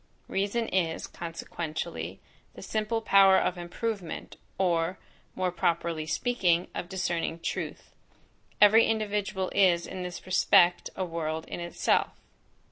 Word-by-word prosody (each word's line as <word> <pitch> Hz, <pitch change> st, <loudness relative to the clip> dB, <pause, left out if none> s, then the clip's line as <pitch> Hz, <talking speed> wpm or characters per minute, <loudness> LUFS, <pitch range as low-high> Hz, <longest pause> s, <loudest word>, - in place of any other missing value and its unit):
Reason 205 Hz, +4 st, -1 dB
is, 170 Hz, -3 st, 0 dB
consequentially, 165 Hz, -1 st, -5 dB, 0.4 s
the -, -, -10 dB
simple 220 Hz, +1 st, -1 dB
power 195 Hz, -2 st, +6 dB
of 180 Hz, -, +1 dB
improvement; 180 Hz, +2 st, -5 dB, 0.2 s
or, 175 Hz, -1 st, +1 dB, 0.4 s
more 185 Hz, -1 st, 0 dB
properly 170 Hz, -2 st, -1 dB
speaking, 180 Hz, -2 st, +1 dB
of 175 Hz, -, -5 dB
discerning 170 Hz, -3 st, -2 dB
truth. -, -, -5 dB, 0.7 s
Every 215 Hz, +2 st, +7 dB
individual 205 Hz, -3 st, -1 dB
is 175 Hz, -3 st, +4 dB
in 185 Hz, -, -6 dB
this 180 Hz, -1 st, -6 dB
respect 180 Hz, -1 st, +4 dB
a 185 Hz, -, -2 dB
world 160 Hz, -2 st, -3 dB
in -, -, -5 dB
itself. 170 Hz, 0 st, 0 dB
180 Hz, 120 wpm, -28 LUFS, 170-200 Hz, 0.7 s, Every